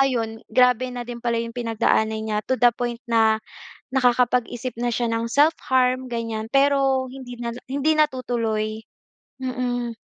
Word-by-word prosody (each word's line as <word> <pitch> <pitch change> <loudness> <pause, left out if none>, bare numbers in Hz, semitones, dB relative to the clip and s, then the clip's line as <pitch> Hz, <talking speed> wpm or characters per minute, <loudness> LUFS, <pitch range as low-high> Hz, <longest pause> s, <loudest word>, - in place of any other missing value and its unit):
Ayon, 230 -4 0
grabe 250 0 +4
na 245 0 -4
din 240 -1 -5
pala 235 -1 +1
‘yong 230 +1 -6
pinagdaanan 220 -1 +1
niya, 210 -1 -1
to 260 - +1
the 245 - +7
point 240 -1 -3
na 220 -1 +3 0.5
nakakapag-isip 250 -1 +1
na 240 +1 0
siya 240 +1 -1
ng 230 0 -1
self-harm, 260 -3 +2
ganyan. 225 -2 -4
Pero 275 -1 +3
hindi 255 -2 -9
na 235 -1 -3 0.2
hindi 285 +4 +1
natutuloy. 230 -6 0 0.6
Mm. 245 -2 -2
245 Hz, 145 wpm, -23 LUFS, 230-255 Hz, 0.6 s, the